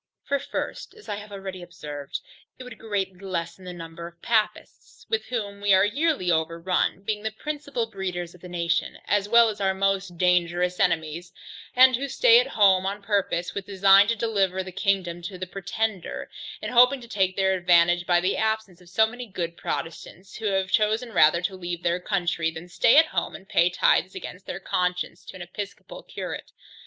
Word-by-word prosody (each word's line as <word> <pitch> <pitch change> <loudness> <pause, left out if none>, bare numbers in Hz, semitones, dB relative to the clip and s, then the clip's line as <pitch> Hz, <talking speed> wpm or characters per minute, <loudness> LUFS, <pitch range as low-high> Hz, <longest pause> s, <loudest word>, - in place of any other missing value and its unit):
For 280 - 0
first, 280 - -5
as 435 - -16
I 205 - -3
have 210 0 -10
already 195 -2 -7
observed, 150 -5 -7 0.4
it 255 - -9
would 250 -1 -11
greatly 195 -4 -3
lessen 185 -1 -5
the 180 - -6
number 170 -1 -8
of 170 0 -15
Papists, 215 -2 -2
with 450 0 -1
whom 205 -5 -4
we 205 -1 +5
are 190 +1 +5
yearly 275 - +1
overrun, 170 +4 0
being 210 0 -2
the 220 - -2
principal 285 +1 -4
breeders 180 -5 -5
of 180 - -18
the 180 - -10
nation, 170 -1 -1
as 205 0 +1
well 235 0 +7
as 210 -2 -4
our 190 -1 +1
most 195 -2 -1
dangerous 180 0 +1
enemies, 170 -1 0 0.4
and 255 0 +7
who 280 +2 -3
stay 470 - +6
at - - +1
home 195 -3 +4
on 200 +1 -4
purpose 200 -4 -1
with 200 - -5
a - - -9
design 195 +1 +6
to 230 - +1
deliver 200 -5 0
the 185 - -8
kingdom 180 -3 -1
to 180 +2 -7
the 185 - -4
Pretender, 195 +1 -4 0.3
hoping 250 +3 +5
to 235 - -12
take 190 -4 0
their 190 -1 +2
advantage 175 -1 +3
by 175 -1 +4
the 185 +2 0
absence 220 -5 -2
of 175 - -17
so 220 +5 +4
many 245 +2 -7
good 170 -4 -4
Protestants, 170 +4 -6
who 225 - -6
have 190 -1 0
chosen 220 +2 +1
rather 170 0 +5
to 190 +1 -2
leave 175 -1 -5
their 175 +1 +1
country, 175 -3 -1
than 165 +2 -9
stay 230 +8 +4
at 320 - +8
home - - -3
and 190 - -12
pay 175 -1 +3
tithes 185 +1 +2
against 185 +2 -8
their 180 - -5
conscience 180 -1 -2
to - - -10
an 185 - -7
episcopal 200 +3 -8
curate. - - -7
190 Hz, 195 wpm, -25 LUFS, 175-215 Hz, 0.4 s, at